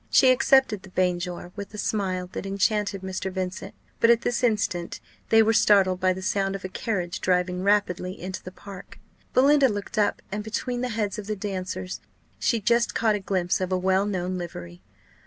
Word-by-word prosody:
She 260 -2 +6
accepted 265 -5 +3
the 190 - -13
banjore 180 -1 -2
with 205 0 -7
a - - -7
smile 190 -4 -1
that - - -5
enchanted 200 0 0
Mr. 190 0 -4
Vincent; 185 +1 -5 0.2
but 230 - +4
at 235 -1 +5
this 245 +1 -1
instant 205 -7 0 0.3
they 225 0 +6
were 225 +1 +2
startled 195 -4 +4
by 185 0 +3
the 190 +1 -4
sound 195 0 0
of 195 - -6
a - - -4
carriage 185 -3 -3
driving 180 0 +1
rapidly 185 -2 0
into 185 +1 -5
the 185 - -9
park. 195 0 -11 0.4
Belinda 275 +1 +5
looked 205 +1 -3
up, 210 - +1
and 210 +1 -3
between 245 +3 -3
the 250 - -1
heads 210 -2 -2
of 205 - -8
the 215 - -2
dancers 185 -2 -5 0.4
she 230 - +1
just 235 +2 +1
caught 220 -2 +2
a 210 - -1
glimpse 190 -2 -1
of 185 0 -2
a 185 - +2
well 190 +2 +2
known 185 -2 -2
livery. 90 - -8
195 Hz, 195 wpm, -25 LUFS, 185-215 Hz, 0.4 s, She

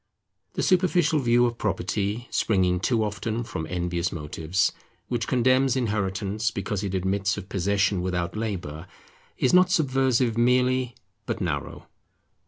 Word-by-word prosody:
The - - -2
superficial 175 -4 +3
view 120 -1 +3
of 120 -1 -2
property, 100 +3 -2
springing 90 -4 +2
too 115 +4 +1
often 110 +2 -3
from 95 -9 -5
envious 85 -1 -1
motives, 80 +3 -1 0.4
which 120 -3 -1
condemns 130 +1 +3
Inheritance 105 -2 -1
because 105 -1 -3
it 95 -1 -2
admits 95 +3 0
of 95 - -8
possession 100 0 +1
without 90 -1 -2
labour, 90 -7 -4 0.5
is 130 - +2
not 180 0 +6
subversive 130 - +2
merely, 125 +1 +2 0.3
but - - -2
narrow. - - -3
105 Hz, 130 wpm, -25 LUFS, 95-125 Hz, 0.5 s, not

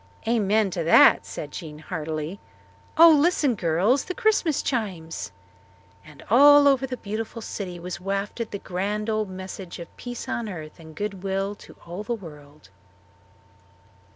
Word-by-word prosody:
"Amen 215 -3 +2
to 170 -1 -2
that!" 165 - +6
said 150 - -7
Jean 155 -4 -8
heartily. 155 +3 -5 0.6
"Oh, 330 +1 +9
listen, 300 -3 +3
girls 190 - +1
the 370 - -5
Christmas 430 - +1
chimes!" 180 - -3 0.7
And 150 -2 -15
over - - -4
all 285 +1 +8
the 260 -1 -5
beautiful 220 +2 -5
city 180 -5 -6
was 180 +1 -6
wafted 200 +4 -3
the 200 - -5
grand 205 +4 -3
old 215 -2 -1
message 185 -1 -8
of 170 - -11
peace 245 -1 -7
on 235 -2 -3
earth 155 -5 -8
and 160 -1 -13
good 205 -1 -4
will 195 +1 -2
to - - -15
all 175 +4 -6
the 235 +3 -2
world. 150 - -14
200 Hz, 150 wpm, -25 LUFS, 170-235 Hz, 0.7 s, Oh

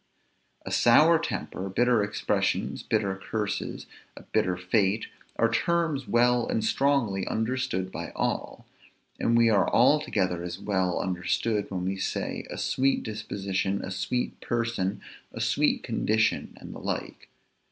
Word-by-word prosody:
A - - -5
sour 155 +8 +6
temper, 100 - -4
bitter 120 +3 +3
expressions, 105 0 -1
bitter 95 -1 0
curses, 105 +1 -3 0.3
a - - -10
bitter 90 -1 0
fate, 100 +3 +1 0.3
are 115 - +3
terms 155 +1 0
well 120 0 +3
and 110 - -1
strongly 115 -6 +1
understood 110 -5 -1
by - - -5
all. - - -2 0.5
And 115 - +2
we 115 -1 +5
are 100 -2 +3
altogether 105 - +2
as 90 0 -5
well 95 -3 0
understood 95 +4 -1
when 90 -2 -3
we 95 +1 -1
say, 95 - -3
a - - -6
sweet 135 +1 +1
disposition, 100 -3 -2
a 95 - -6
sweet 125 +6 -2
person, 115 -5 -1 0.3
a - - -7
sweet - - +1
condition 110 +1 0
and - - -9
the - - -8
like. - - -5
110 Hz, 135 wpm, -27 LUFS, 95-120 Hz, 0.5 s, sour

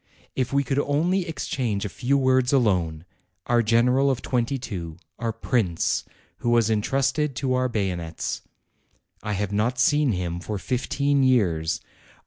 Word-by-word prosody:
If 130 -2 -1
we 140 0 +2
could 135 +1 0
only 170 +6 +1
exchange 120 -10 -2
a 100 - -6
few 140 +3 +1
words 130 -1 +3
alone! 90 - +1 0.4
Our 120 -1 +3
general 125 +5 +3
of 130 -3 -1
twenty 125 +2 0
two; 90 -10 -6 0.2
our 115 -1 -1
prince, 110 -6 0 0.3
who 120 - -2
was 115 -2 +3
intrusted 135 +6 0
to 130 +1 -1
our 130 0 +1
bayonets! 90 -7 -3 0.8
I 105 - -3
have 100 0 -2
not 115 +5 +1
seen 145 -1 +3
him 85 -2 -3
for 105 +3 -4
fifteen 135 +6 0
years. 85 -11 +2
120 Hz, 145 wpm, -24 LUFS, 100-135 Hz, 0.8 s, words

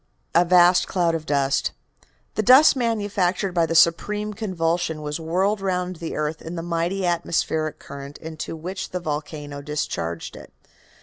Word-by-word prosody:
A 170 - +6
VAST 175 0 +5
CLOUD 175 -3 +1
Of 160 -1 -4
DUST 140 -1 +1 0.6
"The - - 0
dust 260 +8 +7
manufactured 205 -6 0
by 170 -2 +2
the 165 - -2
supreme 210 +6 +3
convulsion 170 -6 -1
was 150 +2 -3
whirled 190 +6 0
round 180 -2 -2
the 165 0 -5
earth 155 +1 -2
in 165 +2 -7
the 165 - -4
mighty 175 +3 -1
atmospheric 165 -2 0
current 140 0 -9
into 160 0 -6
which 185 +4 -5
the 180 - -3
volcano 150 -2 -5
discharged 115 - -4
it. - - -12
170 Hz, 150 wpm, -23 LUFS, 155-185 Hz, 0.6 s, dust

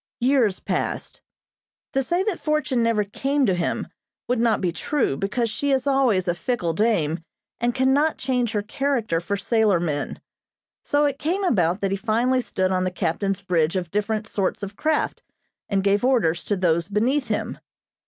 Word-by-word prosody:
Years 245 -6 +2
passed. - - -3 0.7
To 270 - +2
say 345 +8 0
that 390 -4 -2
fortune 305 -5 0
never 230 -2 +2
came 270 +7 0
to 195 - +2
him 175 -1 -1 0.4
would 245 -1 +1
not 230 -2 +2
be 180 -3 0
true, 210 - 0
because 210 - -1
she 255 +6 -2
is 270 -1 +2
always 255 -9 +2
a 175 - +2
fickle 175 -1 -2
dame, 170 -6 +1 0.4
and 240 +1 0
cannot 270 +4 +2
change 250 -3 -1
her 205 -1 0
character 230 -6 -1
for 200 +4 -2
sailor 215 -4 +2
men. 150 -4 -2 0.6
So 290 +1 +2
it 280 -1 -1
came 355 +7 -1
about 185 - +2
that 195 -1 0
he 195 - 0
finally 240 +5 +1
stood 190 -5 -1
on 185 -1 +1
the 185 - +1
captain's 190 +2 -2
bridge 170 -2 +1
of 175 -3 -2
different 215 +1 -1
sorts 200 0 -2
of 200 +1 -6
craft, 310 +4 0 0.5
and 195 -1 +1
gave 200 +2 +2
orders 225 -11 +2
to 205 - 0
those 170 -2 +1
beneath 240 +7 +1
him. 215 - -2
215 Hz, 175 wpm, -23 LUFS, 185-260 Hz, 0.7 s, Years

